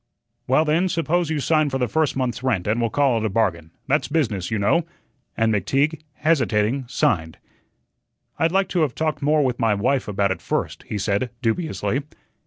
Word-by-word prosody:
"Well, 135 +5 +3
then, 165 +5 +2
suppose 170 0 0
you 155 -2 -1
sign 155 +1 +2
for 135 - -1
the 125 -2 0
first 160 +1 0
month's 125 -3 -2
rent, 115 -9 0
and 110 +3 0
we'll 115 - +1
call 135 -2 +2
it 110 - -2
a - - +1
bargain. 95 -7 0 0.2
That's 145 +3 +1
business, 115 - -1
you 110 - -1
know," 105 +12 +2 0.5
and 110 -1 +2
McTeague, 140 - 0
hesitating, 130 -5 +1
signed. 80 - 0 1.0
"I'd 165 0 +2
like 195 +1 +2
to 180 - 0
have 145 -6 0
talked 155 -2 -1
more 150 0 +3
with 125 -2 -1
my 115 -3 +2
wife 125 +6 0
about 100 -1 0
it 95 - -3
first," - - -3
he 105 - -3
said, 100 +5 0
dubiously. 135 +2 -1
130 Hz, 190 wpm, -22 LUFS, 110-155 Hz, 1.0 s, Well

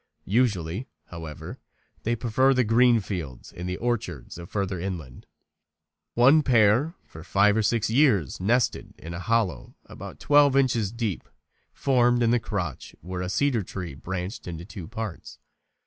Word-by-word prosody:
Usually, 105 -2 0 0.2
however, 80 -3 -8 0.4
they 120 +1 0
prefer 130 +4 +2
the 125 - +3
green 115 +1 +4
fields 80 - -6
and 90 +1 -6
orchards 120 -6 -3
of 85 - -9
further 100 -3 -2
inland. 85 -9 -6 0.9
One 135 +6 +6
pair 125 - +3
for 80 - -12
five 100 +4 +3
or 110 - +2
six 110 +1 +1
years 110 - +2
nested 115 +6 0
in 85 +1 -8
a 85 - -5
hollow 105 - -1
about - - -10
twelve 145 -2 +4
inches 120 -7 +2
deep 115 -6 -4 0.4
formed 120 -3 +2
in 115 - +3
the 120 - +3
crotch 100 -5 -5
where 90 +1 -5
a 90 - -3
cedar 135 +1 +1
tree 90 -4 -6
branched 90 - -6
into 85 -1 -6
two 95 -4 -9
parts. 110 -4 -7
105 Hz, 150 wpm, -26 LUFS, 90-120 Hz, 0.9 s, One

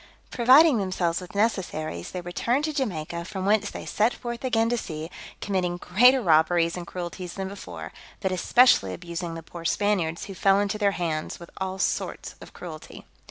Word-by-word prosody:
Providing 255 +2 +6
themselves 185 -3 -1
with 180 +2 -11
necessaries, 175 - -1
they 180 - -5
returned 235 +10 -1
to 310 - -2
Jamaica, 170 - -3
from 190 +1 -5
whence 210 +1 +2
they - - -8
set 220 +4 +1
forth 235 0 -6
again 230 -3 +2
to 240 - +1
sea, 160 -1 -6 0.3
committing 180 -3 -1
greater 245 +9 +4
robberies 165 0 +3
and 175 -1 -6
cruelties 180 0 -6
than 190 -1 -3
before; 200 +1 -8 0.3
but 190 - -1
especially 185 - +4
abusing 170 -1 -5
the 165 - -8
poor 170 +1 -10
Spaniards, 170 -3 0
who 195 - -8
fell 195 +1 +3
into 205 +1 -1
their 200 -2 +2
hands, 160 -3 -3
with 170 - -12
all 190 0 -3
sorts - - -2
of - - -11
cruelty. 160 -3 -10
185 Hz, 175 wpm, -25 LUFS, 170-215 Hz, 0.3 s, Providing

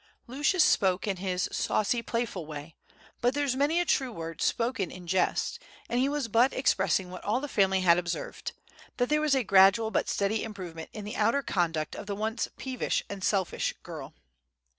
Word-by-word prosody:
Lucius 295 - +2
spoke 190 -2 +3
in 195 -2 -1
his 185 -1 -1
saucy 235 +3 0
playful 230 -8 -3
way, 150 +1 -8 0.5
but 245 +2 +2
"there's 285 -3 0
many 290 +5 +2
a 350 - +1
true 265 -6 +1
word 165 -5 -7
spoken 230 -6 0
in 180 -1 -10
jest," 190 - 0 0.3
and 240 - 0
he 265 +2 +2
was 290 -4 -1
but 235 +4 +4
expressing 190 - +1
what 180 - -8
all 215 +5 +1
the 290 - -4
family 190 -6 +2
had 175 -1 +5
observed, 175 -1 -4 0.4
that 245 0 +1
there 300 0 +2
was 300 -2 +3
gradual 195 +4 +5
but - - 0
steady 205 +2 0
improvement 180 -7 -7
in 210 -2 -7
the 210 - -5
outer 230 +6 +2
conduct 165 -7 -1
of - - -8
the 200 - -2
once 220 +3 -2
peevish 260 -2 -2
and 195 -2 -6
selfish 195 -4 0
girl. - - -8
210 Hz, 185 wpm, -29 LUFS, 185-255 Hz, 0.5 s, had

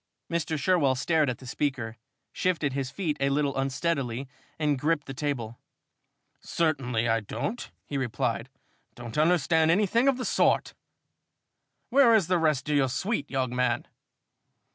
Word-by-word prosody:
Mr. 165 -1 -1
Sherwell 145 -4 +2
stared 155 +2 +2
at 125 - -3
the 130 - -13
speaker, 125 -4 -2 0.4
shifted 160 -7 0
his 135 -1 -2
feet 155 -1 -2
a 140 0 +2
little 140 0 0
unsteadily 135 -2 -1 0.3
and 150 -3 0
gripped 150 +1 0
the 135 - -6
table. 130 -5 -3 0.8
"Certainly 125 -8 0
I 115 0 +2
don't," 210 - -4 0.2
he 140 - -3
replied, 120 0 -2 0.5
"don't 120 -2 -8
understand 160 0 +3
anything 210 +8 +3
of 270 -2 +3
the 255 - -4
sort! - - +2 1.2
Where 250 -3 +6
is 205 -6 +3
the 180 +1 +1
rest 155 -4 +1
of 150 -1 +2
the 135 -2 +3
suite, 150 - -2
young 130 -2 -1
man?" 125 -1 +1
145 Hz, 145 wpm, -27 LUFS, 130-165 Hz, 1.2 s, Where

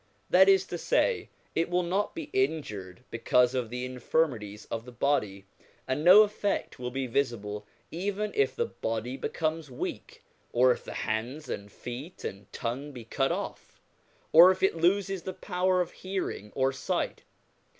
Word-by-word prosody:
That 190 +2 +7
is 195 -1 +5
to 175 -2 -5
say, 470 - +1 0.2
it 165 - 0
will 180 0 +1
not 190 +4 -1
be 160 - -6
injured 125 - -2
because 125 +2 +3
of 125 -3 -1
the 125 +1 -4
infirmities 125 -5 -1
of 115 - -3
the 125 - -10
body, 105 -7 0 0.4
and 130 +3 -1
no 190 +5 +10
effect 205 -6 -2
will 125 0 -3
be 135 +1 -2
visible 110 -5 -2 0.2
even 200 +5 -2
if 425 - +1
the 470 - 0
body 115 - -3
becomes 155 +1 -2
weak, 125 - -6 0.3
or 125 +1 +5
if - - -2
the - - -8
hands 120 +8 -3
and 100 0 -5
feet 130 - -8
and 100 0 -7
tongue 135 +5 -4
be 120 -3 -9
cut 135 +4 0
off, - - -5 0.5
or 170 +3 +10
if 190 0 0
it 190 - +3
loses 190 +3 +1
the 185 - -5
power 185 -1 +1
of 175 - -3
hearing 185 - -4
or 135 0 +2
sight. 135 - -2
140 Hz, 165 wpm, -29 LUFS, 120-180 Hz, 0.5 s, no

